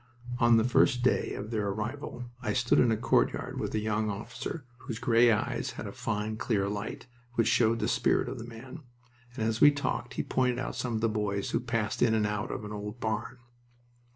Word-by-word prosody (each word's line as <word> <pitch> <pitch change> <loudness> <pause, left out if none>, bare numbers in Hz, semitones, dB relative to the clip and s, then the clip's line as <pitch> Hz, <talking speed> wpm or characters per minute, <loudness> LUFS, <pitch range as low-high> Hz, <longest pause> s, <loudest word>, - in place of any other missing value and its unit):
On 120 -1 +6
that 110 - +4
first 125 0 +4
day 130 - +2
of 105 +2 -6
their 105 -3 0
arrival 120 +5 -4 0.2
I 110 -4 -1
stood 120 -2 +3
in 125 - +5
a 110 - +2
courtyard - - +1
with - - -3
a - - +2
young 110 0 0
officer 115 +8 -5
whose 120 -4 -6
gray 120 0 +4
eyes 105 - -1
had - - -6
a - - -5
fine, 110 0 -3
clear 100 -4 0
light, 105 +3 -4 0.3
which 115 - +3
showed 115 -1 +3
the - - -1
spirit - - +2
of - - -5
the 115 - -7
man, 120 +6 -9 0.6
and 115 - -2
as 115 0 -1
we 145 - +10
talked 135 -3 -2
he - - -1
pointed 125 -1 +1
out 130 - -3
some 120 -2 -2
of 110 - -1
the 115 - +3
boys 105 -2 -1
who - - +1
passed 115 -3 -2
in 115 -2 +4
and 110 -1 +2
out 105 +3 -2
of 105 - -4
an 105 - -7
old 105 +2 -6
barn. 110 +2 -2
115 Hz, 215 wpm, -29 LUFS, 105-120 Hz, 0.6 s, we